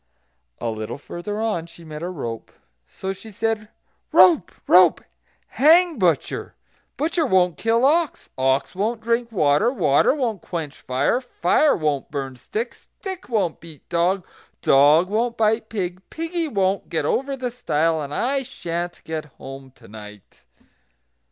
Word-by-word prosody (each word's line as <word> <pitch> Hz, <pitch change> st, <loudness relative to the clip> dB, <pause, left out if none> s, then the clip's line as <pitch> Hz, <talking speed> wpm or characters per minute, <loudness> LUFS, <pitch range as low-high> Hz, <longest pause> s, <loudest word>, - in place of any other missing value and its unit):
A 115 Hz, -, -2 dB
little 110 Hz, -1 st, -5 dB
further 175 Hz, +8 st, -6 dB
on 210 Hz, -7 st, -1 dB
she 170 Hz, 0 st, -15 dB
met 155 Hz, -1 st, -8 dB
a 175 Hz, -, -3 dB
rope. 120 Hz, -10 st, -6 dB, 0.4 s
So 190 Hz, 0 st, -5 dB
she 220 Hz, +3 st, -12 dB
said: 220 Hz, 0 st, -2 dB, 0.4 s
"Rope! 350 Hz, -3 st, +6 dB, 0.2 s
rope! -, -, +6 dB, 0.5 s
hang 335 Hz, +4 st, +4 dB
butcher; -, -, 0 dB, 0.4 s
butcher 325 Hz, +3 st, 0 dB
won't 185 Hz, -, +3 dB
kill 230 Hz, +2 st, +2 dB
ox; 320 Hz, +2 st, +1 dB
ox 130 Hz, +1 st, +1 dB
won't 215 Hz, +5 st, -1 dB
drink 230 Hz, +1 st, -1 dB
water; 175 Hz, +4 st, +3 dB
water 170 Hz, -, +3 dB
won't 230 Hz, -, -2 dB
quench 160 Hz, -5 st, -6 dB
fire; 130 Hz, -, 0 dB
fire 255 Hz, -, +2 dB
won't 150 Hz, -4 st, -1 dB
burn 135 Hz, -3 st, -4 dB
stick; 215 Hz, -, -4 dB
stick 380 Hz, -5 st, -9 dB
won't 205 Hz, -8 st, 0 dB
beat 160 Hz, -4 st, -14 dB
dog; 175 Hz, +2 st, +1 dB, 0.4 s
dog 145 Hz, +6 st, +5 dB
won't 230 Hz, +2 st, 0 dB
bite 220 Hz, 0 st, +1 dB
pig; 185 Hz, -4 st, -3 dB
piggy 330 Hz, 0 st, -3 dB
won't 195 Hz, -6 st, 0 dB
get 160 Hz, -3 st, -1 dB
over 270 Hz, -, 0 dB
the 250 Hz, -1 st, -3 dB
stile; 165 Hz, -9 st, 0 dB
and 140 Hz, -1 st, -6 dB
I 270 Hz, -, 0 dB
sha'n't 175 Hz, -7 st, -5 dB
get 160 Hz, -1 st, -4 dB
home 135 Hz, -1 st, -11 dB
to -, -, -17 dB
night." 105 Hz, -1 st, -13 dB
190 Hz, 145 wpm, -22 LUFS, 155-240 Hz, 0.5 s, Rope